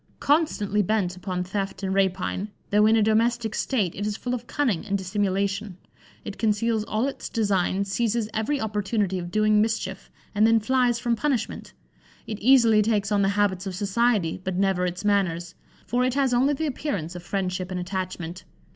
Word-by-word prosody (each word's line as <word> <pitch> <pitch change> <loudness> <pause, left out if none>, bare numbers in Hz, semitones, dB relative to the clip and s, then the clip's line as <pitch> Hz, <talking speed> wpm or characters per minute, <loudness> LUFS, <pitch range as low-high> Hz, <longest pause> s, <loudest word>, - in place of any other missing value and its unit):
Constantly 255 - +2
bent 195 -3 0
upon 180 -1 -3
theft 195 +2 -4
and 190 0 -1
rapine, 190 0 0 0.2
though 210 +1 +5
in 220 - +5
a 220 - +4
domestic 225 +1 +1
state, 210 -10 0
it 205 - -5
is 210 0 -3
full 250 - -3
of 245 -1 -4
cunning 245 - 0
and 200 -2 -1
dissimulation: 195 0 -1 0.5
it 205 - -7
conceals 220 0 +1
all 220 +5 0
its 275 - -6
designs, 200 -3 0
seizes 230 +1 0
every 230 +7 -1
opportunity 205 -3 -1
of 175 0 -6
doing 215 +2 +3
mischief, 205 -3 -2 0.2
and 215 +1 +4
then 225 0 +5
flies 245 +1 +2
from 235 -1 0
punishment. 255 -3 -2 0.5
It 215 -2 -5
easily 230 -3 +5
takes 210 -2 0
on 205 -1 +3
the 195 - +3
habits 195 -2 +1
of 190 - -4
society, 200 -3 +1
but 185 -1 -2
never 190 -2 +1
its 180 +3 -5
manners; 180 -4 0 0.3
for 245 +1 0
it 255 0 0
has 270 -3 +2
only 270 +4 +3
the 320 - -2
appearance 215 - -3
of 175 - -6
friendship 185 0 -3
and 185 -1 -3
attachment. 180 -1 -5
205 Hz, 180 wpm, -25 LUFS, 190-230 Hz, 0.5 s, though